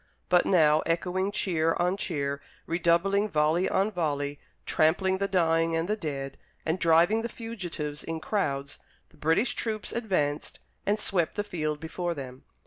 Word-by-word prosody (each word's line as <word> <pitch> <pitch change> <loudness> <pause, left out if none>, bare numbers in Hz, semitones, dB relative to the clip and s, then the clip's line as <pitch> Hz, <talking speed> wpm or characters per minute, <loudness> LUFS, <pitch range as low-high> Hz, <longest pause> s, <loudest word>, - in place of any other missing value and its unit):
But 180 -1 +4
now, 155 -5 +5
echoing 180 +3 0
cheer 165 -6 +1
on 180 +2 +1
cheer, 140 -8 -2 0.2
redoubling 175 +5 +2
volley 155 +2 +2
on 200 +3 +1
volley, 145 -5 -2 0.3
trampling 190 +4 +2
the 200 - +1
dying 165 -3 +2
and 165 +1 0
the 210 - +1
dead, 140 -8 -5 0.3
and 160 +3 0
driving 170 +7 +4
the 235 - -3
fugitives 175 -11 -5
in 165 0 -4
crowds, 140 -7 -2 0.3
the 155 - -23
British 165 - +2
troops 215 -2 -2
advanced 170 -11 -1 0.3
and 210 +1 +2
swept 180 -6 0
the 205 - -1
field 155 -7 -3
before 170 +2 -3
them. 130 -2 -8
170 Hz, 150 wpm, -28 LUFS, 155-195 Hz, 0.3 s, now